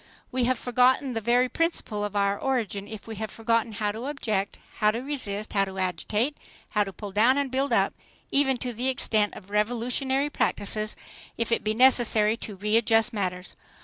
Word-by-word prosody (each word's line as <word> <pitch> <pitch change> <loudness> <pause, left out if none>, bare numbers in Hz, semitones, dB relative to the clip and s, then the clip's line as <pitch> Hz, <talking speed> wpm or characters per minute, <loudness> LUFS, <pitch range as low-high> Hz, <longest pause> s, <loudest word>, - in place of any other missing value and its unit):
We 250 -1 +1
have 255 0 +1
forgotten 250 +2 +2
the 225 - -2
very 245 +3 +3
principle 255 -9 -1
of 205 0 -4
our 200 0 +2
origin 210 -5 -2
if 215 -1 -9
we 225 -2 -8
have 220 +1 -4
forgotten 230 0 0
how 210 0 -1
to 225 +4 -7
object, 215 -9 -2 0.2
how 210 - +4
to 220 +2 -1
resist, 240 -7 -4
how 195 -1 +3
to 190 0 -8
agitate, 205 - -1 0.4
how 210 -2 +2
to 195 - -6
pull 205 +1 -8
down 230 +7 +4
and 280 -2 -1
build 270 +2 0
up, - - +2 0.4
even 270 -2 +3
to 245 0 -4
the 245 +4 -1
extent 215 -5 +1
of 200 0 -12
revolutionary 245 +6 0
practices, 215 -2 -1 0.4
if 230 0 -1
it 230 - +1
be 215 0 0
necessary 230 -4 +5
to 210 - -7
readjust 225 +3 +2
matters. 180 -3 -3
225 Hz, 185 wpm, -26 LUFS, 210-250 Hz, 0.4 s, necessary